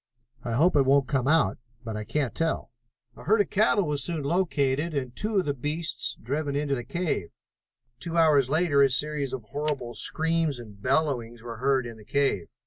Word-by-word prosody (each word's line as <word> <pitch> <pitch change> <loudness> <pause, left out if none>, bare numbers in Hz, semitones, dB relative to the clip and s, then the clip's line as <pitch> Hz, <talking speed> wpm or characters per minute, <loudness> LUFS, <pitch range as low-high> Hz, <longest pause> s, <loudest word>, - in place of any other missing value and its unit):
I 120 - -3
hope 160 +10 +3
it 145 - +6
won't 135 0 +3
come 135 -2 0
out, 150 -11 +3 0.2
but 110 -2 -5
I 105 - -4
can't 145 -1 -1
tell." 165 -6 -2 0.4
A - - -13
herd 215 +3 +4
of 205 - +1
cattle 205 -1 +3
was 145 -2 -1
soon 165 -4 -3
located 150 -2 0
and 130 -3 -3
two 215 0 -1
of 190 - +2
the 145 - 0
beasts 150 +5 -3
driven 140 +4 -2
into 145 -1 0
the 120 -3 -2
cave. 145 - -2 0.7
Two 170 +4 -4
hours 150 -5 +4
later 155 -2 +3
a 135 - +6
series 145 +1 0
of 130 -3 -5
horrible 140 -1 -3
screams 160 +5 0
and 105 -4 -12
bellowings 125 -4 0
were 115 -1 -7
heard 130 +1 +1
in 115 -1 -8
the 110 - -14
cave. 125 -7 0
140 Hz, 195 wpm, -27 LUFS, 125-160 Hz, 0.7 s, it